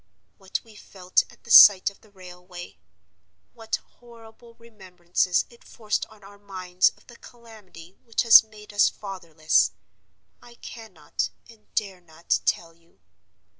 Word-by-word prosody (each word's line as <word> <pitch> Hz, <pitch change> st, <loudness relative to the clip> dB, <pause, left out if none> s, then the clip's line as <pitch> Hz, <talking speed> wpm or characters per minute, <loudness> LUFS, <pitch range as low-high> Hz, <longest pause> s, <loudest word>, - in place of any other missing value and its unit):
What 190 Hz, 0 st, -5 dB
we 225 Hz, -, -19 dB
felt 185 Hz, -3 st, -2 dB
at -, -, -22 dB
the 235 Hz, -, -10 dB
sight 200 Hz, -1 st, +8 dB
of 200 Hz, -, -25 dB
the 215 Hz, -, -23 dB
railway—what 175 Hz, -, -11 dB
horrible 230 Hz, 0 st, -17 dB
remembrances 185 Hz, -6 st, -3 dB
it 235 Hz, -, -20 dB
forced 215 Hz, -3 st, -4 dB
on 215 Hz, -2 st, -20 dB
our 200 Hz, +1 st, -16 dB
minds 185 Hz, -2 st, 0 dB
of -, -, -26 dB
the 240 Hz, -, -17 dB
calamity 210 Hz, -7 st, -16 dB
which 230 Hz, 0 st, -2 dB
has 230 Hz, -2 st, +8 dB
made 210 Hz, -1 st, -16 dB
us 205 Hz, -, +3 dB
fatherless—I 180 Hz, +5 st, -4 dB
cannot, 215 Hz, -11 st, -7 dB, 0.2 s
and 225 Hz, -2 st, -21 dB
dare 195 Hz, -4 st, -3 dB
not, 165 Hz, -1 st, -3 dB
tell 165 Hz, -1 st, -1 dB
you. 165 Hz, 0 st, -32 dB
195 Hz, 130 wpm, -24 LUFS, 175-220 Hz, 0.2 s, sight